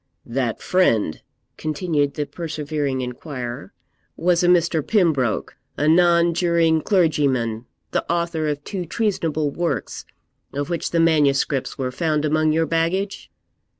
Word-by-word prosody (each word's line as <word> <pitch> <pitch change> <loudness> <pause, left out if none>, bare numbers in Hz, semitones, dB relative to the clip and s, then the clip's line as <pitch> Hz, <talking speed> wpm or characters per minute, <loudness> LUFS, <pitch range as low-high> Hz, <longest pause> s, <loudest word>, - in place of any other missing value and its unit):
'That 120 -2 -2
friend,' 115 - +2 0.4
continued 155 -3 -1
the 150 - -2
persevering 145 -3 -3
inquirer, 125 -1 -6 0.5
'was 175 0 +2
a - - +3
Mr. 170 -2 +3
Pembroke, 155 - +1 0.2
a 150 - +1
nonjuring 170 -1 +3
clergyman, 135 - +1 0.2
the - - 0
author 170 -2 -1
of 145 -1 -2
two 190 +1 -4
treasonable 165 -6 -1
works, 170 +3 -3 0.5
of 145 +3 -3
which 170 -2 -2
the 170 - 0
manuscripts 145 -4 +2
were 130 -1 -2
found 155 +2 0
among 155 +1 +2
your 165 +1 +2
baggage?' 170 +5 -1
155 Hz, 120 wpm, -22 LUFS, 140-170 Hz, 0.5 s, a